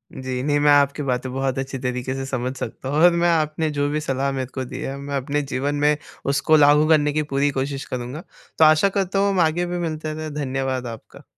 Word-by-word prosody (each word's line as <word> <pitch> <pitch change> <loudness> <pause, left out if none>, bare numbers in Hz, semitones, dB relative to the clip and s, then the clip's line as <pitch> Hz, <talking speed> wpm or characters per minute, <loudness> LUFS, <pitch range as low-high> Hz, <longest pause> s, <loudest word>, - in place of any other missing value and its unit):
जी। 130 -1 -4
नहीं 145 +1 +1
मैं 145 0 +4
आपकी 145 0 +3
बातें 130 -1 -2
बहुत 135 0 -1
अच्छी 135 0 -4
तरीके 125 0 -3
से 135 0 -4
समझ 130 -1 -3
सकता 130 - -6
हूँ 145 - -1
और 175 - +8
मैं 170 0 +2
आपने 155 -1 +1
जो 145 0 +1
भी 150 +1 -1
सलाह 140 -1 -1
मेरे 135 -1 -2
को 130 -1 -3
दी 130 +1 -7
है, 135 -2 -4
मैं 140 0 -5
अपने 140 +2 -1
जीवन 140 +1 -2
में 150 +1 +2 0.4
उसको 145 +3 +3
लागू 150 +1 +5
करने 150 -2 +3
की 155 +1 0
पूरी 140 +1 +2
कोशिश 135 +1 -3
करूँगा, 125 +6 -6 0.4
तो 160 - +8
आशा 155 +5 +5
करता 195 -1 -1
हूँ 200 0 +3
हम 195 -2 0
आगे 170 +1 +2
भी 175 0 -3
मिलते 155 -2 -3
रहे। 155 0 -5
धन्यवाद 130 -1 -2
आपका। 115 -1 -10
145 Hz, 230 wpm, -22 LUFS, 130-155 Hz, 0.4 s, और